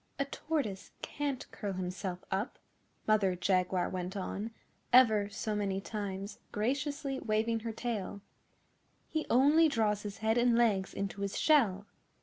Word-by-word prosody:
'A 280 - 0
Tortoise 275 -9 -3
can't 285 -3 -3
curl 200 -2 -4
himself 185 0 -4
up,' 195 +6 -2 0.5
Mother 205 -4 +3
Jaguar 180 0 +1
went 185 +2 -4
on, 200 +3 -3 0.4
ever 220 -5 +6
so 215 +1 -3
many 195 -2 -1
times, 200 -1 -5
graciously 275 +4 -1
waving 225 +1 0
her 225 0 -4
tail. 220 -4 -4 0.9
'He 315 -1 -2
only 295 +6 +5
draws 215 -5 +1
his 205 -1 -6
head 220 +2 +2
and 240 -1 +4
legs 205 -5 +2
into 200 0 -3
his 200 -1 -2
shell. 215 -11 +3
215 Hz, 135 wpm, -32 LUFS, 195-245 Hz, 0.9 s, ever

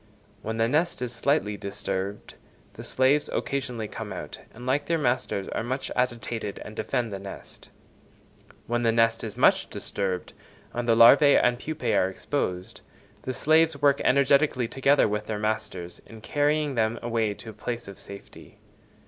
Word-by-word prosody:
When 110 +1 -4
the 115 0 +2
nest 160 +7 +1
is 125 -1 -4
slightly 115 -4 0
disturbed, 100 0 -4 0.4
the - - -9
slaves 135 +3 +2
occasionally 125 -5 -3
come - - -7
out, - - -7
and 120 +2 -11
like 140 +3 0
their 165 - +2
masters 125 -8 -1
are - - -2
much 130 +4 -3
agitated 120 -4 -2
and 110 - -9
defend 110 +1 -2
the 100 - -4
nest: 100 0 -10 1.0
when 120 +1 -1
the 115 -1 +3
nest 115 0 +2
is 110 -3 -6
much - - +4
disturbed, 95 -3 -3 0.4
and 120 0 -2
the 115 - +5
larvæ 135 +5 +7
and 120 0 +2
pupæ 155 +2 -2
are 95 - +3
exposed, 95 -3 -3 0.4
the 130 - -4
slaves 160 +1 +3
work 140 -1 +3
energetically 140 -2 +3
together 135 +2 +3
with 105 0 -3
their 110 - -2
masters 105 -5 -3
in 115 - -12
carrying 145 +3 +1
them 115 -1 0
away 115 -3 0
to 110 - -9
a - - -15
place 120 +1 -5
of 100 - -10
safety. 100 0 -12
115 Hz, 165 wpm, -26 LUFS, 105-140 Hz, 1.0 s, larvæ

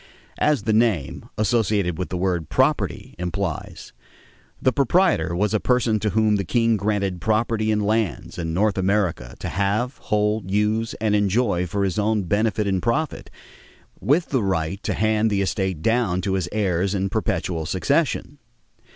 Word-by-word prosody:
As 150 -8 +2
the 110 +1 +1
name, 100 - 0
associated 105 -6 +1
with 90 - -3
the 90 - -3
word 90 -4 -1
"property," - - 0
implies, 90 -1 -4 0.7
the 130 - +2
proprietor 155 - +2
was 105 +4 0
a 110 - +2
person 120 -3 +1
to 105 - 0
whom 110 0 +2
the 100 - -1
king 115 +3 +2
granted 100 -3 -1
property 110 +1 +1
in 105 -1 +2
lands 105 -4 -1
in 80 -1 -2
North 100 +4 +1
America 95 -9 0
to - - -5
have, 105 +7 -1
hold, 105 -2 0
use, 105 +3 0
and 110 -1 0
enjoy 100 -3 +1
for 100 +4 -1
his 95 +1 -1
own 105 0 +1
benefit 105 +3 0
and 95 -2 0
profit, 145 - -1 0.7
with 160 +6 +1
the 130 -4 +1
right 95 -1 -1
to - - -2
hand 110 +1 +2
the 100 -1 +1
estate 95 -5 -2
down 115 -6 +1
to 95 +1 -1
his 90 -3 -1
heirs 95 -2 0
in 95 0 0
perpetual 80 -4 -2
succession. 145 - 0
105 Hz, 160 wpm, -23 LUFS, 95-110 Hz, 0.7 s, As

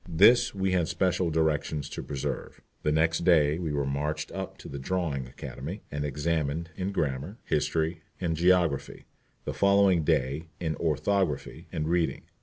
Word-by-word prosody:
This 100 +8 +5
we 95 -1 0
had 90 -3 +2
special 90 -2 +1
directions 75 -2 0
to - - -5
preserve. 70 -2 -4 0.2
The 75 - +1
next 80 +2 +2
day 80 -3 +4
we 85 -4 -2
were 70 -1 0
marched 75 +3 -2
up 95 -1 -5
to - - -11
the 70 - -6
Drawing 70 -4 -2
Academy, 75 - -7
and 75 0 -2
examined 75 +2 -1
in 95 +1 -2
grammar, 75 - -2
history, 80 +2 0 0.2
and 85 -3 0
geography; 85 -4 +2 0.4
the - - -2
following 100 -4 +4
day 70 +3 0
in 80 -3 -1
orthography 85 0 0
and 75 0 -2
reading. 85 0 0
80 Hz, 155 wpm, -28 LUFS, 75-90 Hz, 0.4 s, This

